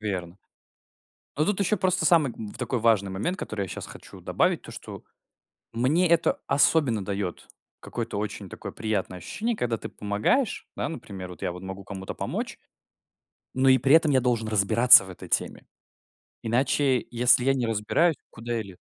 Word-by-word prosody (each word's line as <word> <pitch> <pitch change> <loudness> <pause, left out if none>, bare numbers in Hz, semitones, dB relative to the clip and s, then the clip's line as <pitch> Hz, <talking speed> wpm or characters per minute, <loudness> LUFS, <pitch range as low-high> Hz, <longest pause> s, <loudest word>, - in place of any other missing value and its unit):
Верно. 95 -4 -4 1.0
Но 155 - +2
тут 205 0 0
еще 200 +2 +1
просто 185 0 +1
самый, 155 -8 +4
м, 110 - -7
в - - -10
такой 125 0 -2
важный 110 -4 +2
момент, 140 - -2
который 105 -2 -4
я 95 - -6
щас - - -6
хочу - - -12
добавить: - - +1
то, - - -10
что - - -9 0.7
мне 145 +10 +2
это 170 - +2
особенно 140 -8 +3
дает 100 -2 -4 0.3
какое-то 115 -3 -5
очень 105 -1 -5
такое - - -8
приятное 100 -4 -3
ощущение, 225 - -3
когда 120 - -1
ты - - -7
помогаешь. 105 - -1
Да, - - -2
например, 95 - -8
вот 90 - -12
я 90 - -1
вот 90 +1 -9
могу 95 +1 -7
кому-то 95 -1 -7
помочь, - - -4 1.0
но 130 +1 +3
и 130 - +6
при 135 +3 +2
этом 160 -2 +4
я 130 - +4
должен 120 -3 0
разбираться 110 +2 +6
в 95 - -11
этой 90 - -10
теме. - - -1 0.8
Иначе, 130 +3 +1
если 120 +1 +4
я 135 - +4
не 125 -3 -1
разбираюсь, 115 +10 +1 0.2
куда 120 +1 -6
я 115 - -1
ле 95 -3 -13
115 Hz, 180 wpm, -26 LUFS, 100-140 Hz, 1.0 s, и